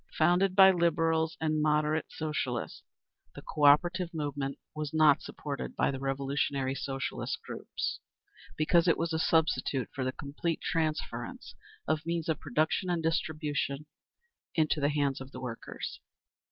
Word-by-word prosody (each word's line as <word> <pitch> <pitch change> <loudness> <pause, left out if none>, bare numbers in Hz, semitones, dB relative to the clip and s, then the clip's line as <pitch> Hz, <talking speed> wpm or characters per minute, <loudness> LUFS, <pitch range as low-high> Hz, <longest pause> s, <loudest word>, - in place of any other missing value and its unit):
Founded 180 +4 +3
by 190 -1 +9
Liberals 165 -2 +1
and 155 -1 +1
"moderate" 150 +1 +2
Socialists, 140 -6 -3 0.5
the - - -9
Cooperative 170 +5 +3
movement 145 -2 -3 0.2
was 155 0 -4
not 155 -1 +6
supported 140 -2 -6
by - - +2
the 135 - -5
revolutionary 135 0 -1
Socialist 135 0 -3
groups, - - -4 0.6
because 170 +3 +3
it 165 - +4
was 165 0 -1
a 160 - 0
substitute 160 -6 +1
for 130 - -2
the 130 - 0
complete 145 +5 -3
transference 160 -2 -3 0.3
of 155 +1 0
means 170 -1 -2
of 160 - 0
production 155 +6 0
and 170 -2 0
distribution 150 -3 -1 0.7
into 155 -1 +2
the 140 - +3
hands 145 -3 0
of 135 0 -9
the 130 - -8
workers. 125 -3 -6
155 Hz, 140 wpm, -30 LUFS, 140-165 Hz, 0.7 s, by